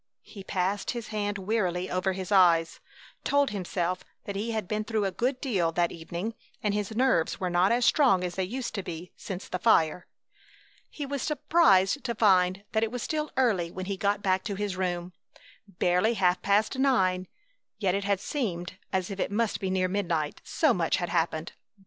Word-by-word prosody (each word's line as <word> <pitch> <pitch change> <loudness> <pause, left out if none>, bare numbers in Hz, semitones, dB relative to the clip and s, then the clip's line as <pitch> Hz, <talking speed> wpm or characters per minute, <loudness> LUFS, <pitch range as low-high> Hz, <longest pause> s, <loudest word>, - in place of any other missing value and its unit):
He 200 -3 -11
passed 190 +1 -1
his 235 - -6
hand 205 -1 -2
wearily 185 -3 -1
over 185 +1 0
his 185 +1 -6
eyes, 170 -4 +4 0.4
told 285 -3 +2
himself 180 -2 -2 0.2
that 200 - -5
he 210 +4 -2
had 220 -4 -2
been 215 +2 -1
through 215 -1 -1
a 195 - 0
good 250 +6 -1
deal 190 - 0
that 170 +1 +1
evening 170 +6 -5 0.3
and 210 -1 +1
his 210 +1 -2
nerves 245 -9 +2
were 185 -2 -1
not 175 +2 +3
as 240 +1 +2
strong 250 -12 +4
as 180 -1 -2
they 190 - -1
used 245 +7 -4
to 200 - -2
be 175 -1 -7
since 190 -2 -7
the 180 - -3
fire. 180 -4 +3 0.8
He 290 - -5
was 280 -1 -3
surprised 290 - +3
to 235 -2 -2
find 190 -3 +3
that 220 - +1
it 225 -1 0
was 245 -1 -4
still 305 -1 -2
early 210 -10 +2
when 185 +2 -6
he 200 +1 -2
got 200 +1 0
back 185 -1 +1
to 200 - -2
his 205 -1 -2
room, 180 -1 -2 0.5
barely 180 +4 +1
half 180 -3 +2
past 210 +6 +1
nine. 185 -9 +2 0.5
Yet 190 -4 +1
it 200 +1 -1
had 200 -1 +1
seemed 185 - -3
as 190 +1 -1
if 195 - -6
it - - 0
must 225 +1 0
be 190 - -2
near 185 0 +1
midnight, 170 -6 -1
so 310 -6 +2
much 170 -5 +1
had 175 -2 -2
happened. 160 0 -1
195 Hz, 195 wpm, -28 LUFS, 180-220 Hz, 0.8 s, eyes